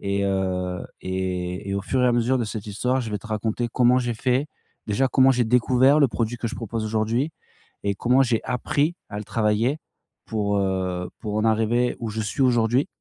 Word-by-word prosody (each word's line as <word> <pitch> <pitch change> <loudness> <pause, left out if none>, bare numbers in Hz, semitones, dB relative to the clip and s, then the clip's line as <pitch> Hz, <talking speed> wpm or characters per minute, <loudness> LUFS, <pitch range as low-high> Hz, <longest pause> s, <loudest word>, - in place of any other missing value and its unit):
Et 100 0 -1
heu, 90 -2 -1 0.2
et 95 0 -3
et 100 - -1
au 100 - -1
fur 125 +7 0
et 125 - +4
à 120 - +3
mesure 120 +2 +2
de 120 - 0
cette 105 -1 -6
histoire, 125 +6 0
je 115 -3 -5
vais 105 - -2
te 105 - -12
raconter 110 +2 -1
comment 125 0 +4
j'ai 120 -2 -1
fait. 130 +5 0 0.4
Déjà, 110 +6 +1
comment 130 0 +5
j'ai 125 -1 +2
découvert 125 +4 +4
le 140 - +6
produit 115 +1 -2
que 120 - -3
je - - -6
propose 115 -1 -4
aujourd'hui 110 +7 0 0.5
et 100 0 +1
comment 125 +6 +3
j'ai 120 -3 +1
appris 145 +6 0
à 105 0 -5
le 105 - -6
travailler 115 +7 +1 0.5
pour, 100 -2 -1
heu, 95 -2 -1
pour 105 -3 -4
en 110 - +1
arriver 115 +2 +2
où 115 -2 -3
je 110 +1 -3
suis 110 +6 -1
aujourd'hui. 120 +1 +3
115 Hz, 210 wpm, -24 LUFS, 100-125 Hz, 0.5 s, le